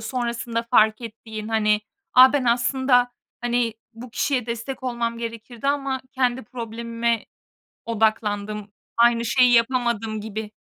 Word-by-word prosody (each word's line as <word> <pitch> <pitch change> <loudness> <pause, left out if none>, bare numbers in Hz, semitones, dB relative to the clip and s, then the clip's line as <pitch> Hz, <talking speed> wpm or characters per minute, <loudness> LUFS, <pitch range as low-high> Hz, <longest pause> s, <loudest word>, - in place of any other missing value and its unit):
sonrasında 235 0 -2
fark 215 -2 +4
ettiğin, 220 -1 -8
hani, 215 -1 +2 0.3
"A, 255 +1 +9
ben 285 -3 +1
aslında, 245 +1 +3 0.3
hani, 240 -1 0 0.2
bu 235 +1 -10
kişiye 250 -1 -1
destek 235 +3 -5
olmam 235 -2 -2
gerekirdi 230 +2 -5
ama 275 -2 -1
kendi 255 0 0
problemime 230 -1 -3 0.6
odaklandım. 210 -2 -1 0.3
Aynı 235 0 +4
şeyi 250 +1 +4
yapamadım." 230 -3 +1
gibi? 215 0 -6
235 Hz, 120 wpm, -23 LUFS, 220-245 Hz, 0.6 s, A